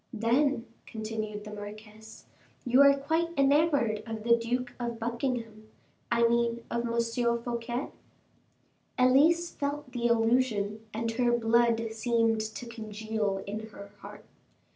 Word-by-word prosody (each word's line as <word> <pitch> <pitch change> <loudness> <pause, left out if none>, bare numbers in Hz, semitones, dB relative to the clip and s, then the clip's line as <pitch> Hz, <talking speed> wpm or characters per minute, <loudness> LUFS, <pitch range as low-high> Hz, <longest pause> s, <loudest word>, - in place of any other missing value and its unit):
"Then," 240 +3 +1 0.2
continued 215 -1 -5
the 210 0 -9
marquise, 215 +1 -10 0.4
"you 250 +2 +5
are 280 0 +7
quite 320 +5 0
enamored 275 -6 +3
of 220 -1 -5
the 235 0 +5
Duke 245 +2 -2
of 235 -1 -3
Buckingham 230 -2 -3 0.4
I 235 0 +4
mean 235 0 0
of 235 0 -1
M. 235 0 0
Fouquet?" 240 +2 -3 1.1
Elise 310 +7 +4
felt 285 -1 -4
the 240 -1 0
allusion, 225 -3 +1
and 225 +1 -2
her 240 +1 +1
blood 230 0 +2
seemed 225 -1 +1
to 220 +3 -6
congeal 215 -3 -3
in 215 +2 -5
her 200 -2 -12
heart. - - -11
235 Hz, 125 wpm, -29 LUFS, 220-245 Hz, 1.1 s, are